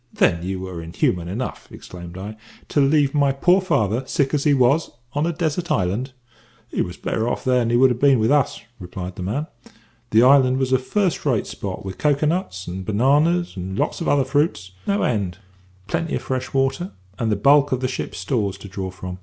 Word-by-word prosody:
"Then 85 - +2
you 95 +1 -3
were 90 -3 -6
inhuman 85 +1 -1
enough," 115 +8 -5
exclaimed 85 0 -10
I, 100 +3 -6 0.3
"to 145 - +2
leave 140 0 +3
my 140 -2 +3
poor 180 +8 +3
father, 130 - +1
sick 135 0 0
as 145 0 0
he 145 - +5
was, 135 +5 +3 0.2
on 145 +3 0
a - - +1
desert 170 +1 -2
island?" 115 +1 -1 0.6
"He - - -1
was 90 - -4
better 115 +2 -1
off - - -3
there 125 -1 +3
than 115 -1 0
he 120 - +3
would 130 +1 +5
ha' - - -12
been 140 -1 +5
with 110 +2 +2
us," 145 -3 +2 0.2
replied 90 0 -7
the - - -7
man. 110 +12 -2 0.6
"The 110 +2 +5
island 130 -1 +5
was 130 -1 0
a 130 - +4
first 185 +7 -1
rate 125 -8 +1
spot, 95 -1 -6
with 95 - -7
cocoa 150 0 +2
nuts 150 - -2
and 95 +2 -5
bananas, 145 - +2
and 95 +1 -5
lots - - -1
of - - -2
other 140 -2 +3
fruits, 135 - 0 0.2
no 200 0 +1
end; 100 -7 -1 0.5
plenty 165 +10 -2
of - - -4
fresh 130 -1 -3
water, 135 +7 0 0.3
and 115 -2 0
the - - +2
bulk 140 +7 +4
of 130 -1 0
the 130 - +1
ship's 130 - -5
stores 105 -8 -1
to - - -10
draw 95 -1 -5
from. 90 0 -8
130 Hz, 210 wpm, -22 LUFS, 95-145 Hz, 0.6 s, he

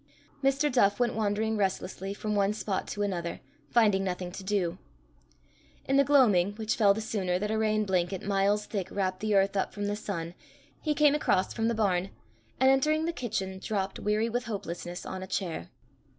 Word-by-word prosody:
Mr. 275 +2 +2
Duff 205 -4 +3
went 245 -1 +2
wandering 220 +1 0
restlessly 195 -1 -2
from 210 +1 -3
one 200 0 +2
spot 205 -2 -3
to 205 - -2
another, 175 -4 -3 0.3
finding 210 -5 +3
nothing 180 -1 -3
to 195 - -8
do. 190 -3 -1 1.1
In 270 - +1
the 280 - +6
gloaming, 215 -10 +4
which 220 0 -2
fell 200 -2 +4
the 220 - -3
sooner 190 -5 -1
that 210 +3 -2
a 220 - 0
rain 215 -1 +1
blanket 185 -1 0
miles 200 +1 +1
thick 195 -4 -4
wrapt 185 -2 -1
the 215 -1 0
earth 195 0 +3
up 195 - 0
from 205 -1 -3
the 205 0 -1
sun, 170 -5 -4 0.5
he 300 -2 0
came 295 -1 +5
across 240 -10 +1
from 225 -1 0
the 230 - +1
barn, 195 -4 +1 0.5
and, 260 +1 +6
entering 305 +4 +2
the 335 - -1
kitchen, 190 -8 -3
dropped, 195 -1 -2
weary 210 +2 +1
with 245 +2 -2
hopelessness, 175 -5 -5
on 190 - -5
a 190 - -6
chair. 175 - -3
205 Hz, 190 wpm, -29 LUFS, 190-220 Hz, 1.1 s, the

